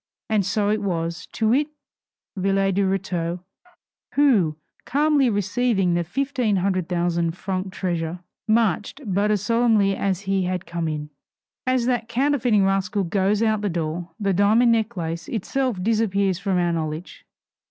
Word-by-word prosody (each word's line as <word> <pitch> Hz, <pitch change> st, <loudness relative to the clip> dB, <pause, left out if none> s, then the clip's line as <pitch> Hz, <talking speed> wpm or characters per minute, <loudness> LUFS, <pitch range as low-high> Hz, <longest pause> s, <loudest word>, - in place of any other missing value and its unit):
And 210 Hz, -2 st, +3 dB
so 205 Hz, +2 st, 0 dB
it 215 Hz, 0 st, 0 dB
was; 170 Hz, -2 st, -3 dB
to 220 Hz, -1 st, +1 dB
wit, 285 Hz, +6 st, +3 dB, 0.7 s
Villette 195 Hz, 0 st, +1 dB
de 200 Hz, -, +1 dB
Rétaux, 180 Hz, -3 st, -1 dB, 0.7 s
who, 210 Hz, -, +3 dB, 0.3 s
calmly 285 Hz, -1 st, +2 dB
receiving 205 Hz, -2 st, +1 dB
the 175 Hz, 0 st, +1 dB
fifteen 250 Hz, -, -1 dB
hundred 185 Hz, -2 st, 0 dB
thousand 170 Hz, -1 st, 0 dB
franc 190 Hz, 0 st, -3 dB
treasure, 175 Hz, -3 st, -2 dB, 0.3 s
marched 220 Hz, -, +1 dB
but 200 Hz, +1 st, +1 dB
as 210 Hz, -2 st, +1 dB
solemnly 220 Hz, -3 st, +3 dB
as 195 Hz, -2 st, -1 dB
he 195 Hz, -1 st, 0 dB
had 180 Hz, 0 st, -2 dB
come 170 Hz, -1 st, -3 dB
in. 150 Hz, -1 st, -4 dB, 0.6 s
As 255 Hz, -2 st, +2 dB
that 240 Hz, -2 st, 0 dB
counterfeiting 245 Hz, -5 st, +2 dB
rascal 195 Hz, +1 st, 0 dB
goes 200 Hz, +4 st, +1 dB
out 220 Hz, -1 st, +2 dB
of -, -, -7 dB
the 205 Hz, -, 0 dB
door, 170 Hz, 0 st, -3 dB
the 200 Hz, -2 st, +1 dB
diamond 215 Hz, +5 st, +4 dB
necklace 175 Hz, -8 st, -1 dB
itself 250 Hz, 0 st, -1 dB
disappears 200 Hz, -4 st, +1 dB
from 195 Hz, -2 st, 0 dB
our 175 Hz, -1 st, +1 dB
knowledge. 160 Hz, +1 st, -4 dB
195 Hz, 150 wpm, -23 LUFS, 175-225 Hz, 0.7 s, diamond